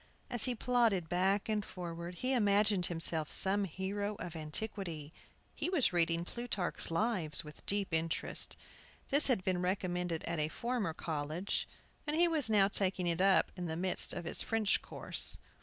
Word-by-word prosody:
As 240 - +3
he 250 -2 0
plodded 225 -8 +2
back 190 +3 +1
and 215 -1 0
forward 170 -1 -6
he 255 +8 0
imagined 205 -4 +3
himself 165 -2 0
some 200 +1 +2
hero 200 +4 -3
of 175 -4 -7
antiquity. 160 -1 -4 0.4
He - - -2
was 310 - +2
reading 170 0 +2
"Plutarch's 225 -5 -2
Lives" 170 -3 +1
with 150 0 -12
deep 200 -3 +1
interest. 160 0 -2 0.5
This 285 +2 +4
had 240 -8 +2
been 180 -1 0
recommended 180 -3 -1
at 170 -1 -2
a 150 - +1
former 225 -2 -2
college, 160 +4 -2 0.4
and 300 - +1
he 345 +2 +5
was 310 -8 +1
now 205 -3 +5
taking 195 -2 +1
it 170 0 +1
up 195 0 +4
in 180 -2 -4
the 160 0 -3
midst 185 +1 0
of 175 - -3
his - - 0
French 220 -2 +1
course. - - 0
190 Hz, 165 wpm, -34 LUFS, 170-215 Hz, 0.5 s, he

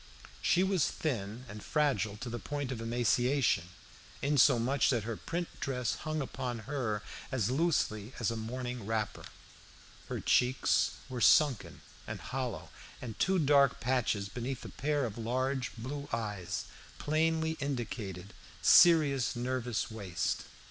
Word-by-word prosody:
She 180 - +3
was 190 -4 +2
thin 120 -4 -3
and 105 0 -8
fragile 135 -9 +1
to 125 +2 -6
the 120 - -4
point 145 +3 -4
of 120 -3 -4
emaciation, 120 - +2 0.6
insomuch 135 -2 +4
that 120 -5 +1
her 115 +1 -3
print 170 +9 -3
dress 125 -3 -1
hung 155 0 -3
upon 125 -3 -4
her 120 -7 -2 0.3
as 125 -4 0
loosely 130 -8 0
as 115 -1 +1
a - - -3
morning 120 0 -5
wrapper. 110 -2 -2 0.8
Her - - -2
cheeks 125 +1 +2
were 125 -2 -5
sunken 135 +2 +4 0.3
and - - -5
hollow, - - -4 0.3
and 115 -4 -7
two 190 +1 +3
dark 140 -4 +4
patches 115 -5 0
beneath 125 +5 -5
a - - -6
pair 145 -1 0
of 115 0 -5
large 130 +3 -1
blue 140 +5 -5
eyes 105 -6 -3 0.3
plainly 160 +1 +1
indicated 110 -8 -4 0.3
serious 150 -8 +6
nervous 125 -1 -2
waste. 100 -6 -2
125 Hz, 135 wpm, -32 LUFS, 110-140 Hz, 0.8 s, serious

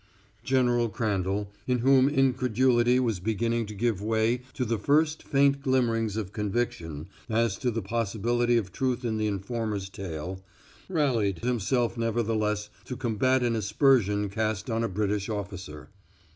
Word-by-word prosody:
General 120 -3 +2
Crandall, 100 -1 -1 0.2
in 125 -1 +2
whom 130 +2 +4
incredulity 125 -2 +3
was 115 -7 0
beginning 115 +3 -1
to 105 - -8
give 110 -2 0
way 110 +3 +1
to 125 - -1
the 115 -1 -1
first 150 +6 +2
faint 140 0 +2
glimmerings 115 -5 +1
of 105 -3 -4
conviction 95 -8 -2 0.2
as 115 -2 +1
to 125 - 0
the 115 -2 -2
possibility 115 +3 0
of 100 -5 -2
truth 125 +3 -1
in 110 -2 -1
the 110 - +1
informer's 105 -1 -3
tale, 95 -1 -6 0.5
rallied 125 - +1
himself 120 0 0
nevertheless 110 -2 -1
to 125 - -6
combat 130 +2 +1
an 120 -1 +1
aspersion 105 -1 +2
cast 110 +1 -2
on 115 +1 0
a 115 - 0
British 100 +1 -1
officer. 95 -8 -6
115 Hz, 145 wpm, -27 LUFS, 105-125 Hz, 0.5 s, whom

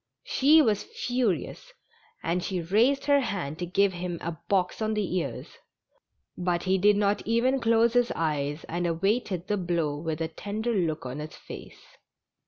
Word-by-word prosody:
She 300 +4 +5
was 215 -5 +2
furious, 255 - -2 0.5
and 175 +2 0 0.3
raised 255 +7 +3
her 285 -1 +5
hand 180 - -3
to 175 - -3
give 195 +2 +2
him 175 -1 -4
a 170 - -3 0.2
box 190 +1 +1
on 215 0 0
the 200 -4 -1
ears, 140 -9 -5 0.8
but 175 -1 -1
he 190 0 +2
did 205 +2 +5
not 205 0 +1
even 245 +4 +2
close 230 0 +3
his 245 -1 +3
eyes, 150 -1 -1
and 175 +1 -2
awaited 185 +1 0
the 205 +1 0
blow 170 -5 -1
with 155 +1 -4
a 165 - -1
tender 210 +8 -3
look 165 -8 -1
on 130 +3 -5
his 150 0 -7
face. - - -11
195 Hz, 165 wpm, -27 LUFS, 170-230 Hz, 0.8 s, She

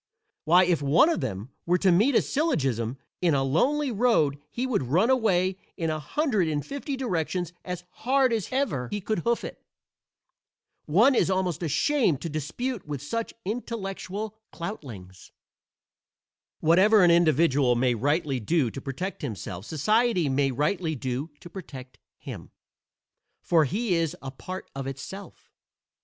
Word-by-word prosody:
Why, 175 +4 +6
if 175 -4 +1
one 145 - +5
of 335 - 0
them 100 +7 -4 0.2
were 180 +1 +4
to 190 0 +3
meet 220 +10 +4
a - - +5
syllogism 135 - 0 0.2
in 170 -5 +3
a 135 - +2
lonely 260 - +1
road 200 - +2
he 245 - -3
would 255 -9 0
run 185 - +3
away 190 -7 +2 0.2
in 165 -3 -1
a 155 - -2
hundred 215 - 0
and 150 -2 -2
fifty 280 0 -4
directions 180 - -2
as 180 -1 -5 0.2
hard 260 -1 +3
as 220 -4 -1
ever 235 - -1
he 205 - -2
could 210 0 -2
hoof 235 +6 0
it. - - -8 1.2
One 215 - +5
is 235 - +2
almost 185 -3 0
ashamed 170 - +1
to 165 - -4
dispute 170 - -4
with 145 -2 -4
such 230 +10 -3
intellectual 210 -1 -4 0.2
cloutlings. 115 - -8 1.3
Whatever 190 +6 +5
an 175 - +6
individual 155 -6 +4
may 125 +1 +2
rightly 145 +3 0
do 130 +1 +1
to 135 - -7
protect 160 +9 -5
himself 100 -7 -5
society 210 - +2
may 135 0 +2
rightly 155 +5 -1
do 130 +4 -3
to - - -10
protect 135 -8 -10 0.2
him, - - -9 0.9
for 165 -3 +3
he 205 - -1
is 165 -3 0
a 135 - -7
part 185 +7 -7
of 135 -1 -5
itself. 140 +9 -9
175 Hz, 150 wpm, -26 LUFS, 140-215 Hz, 1.3 s, Why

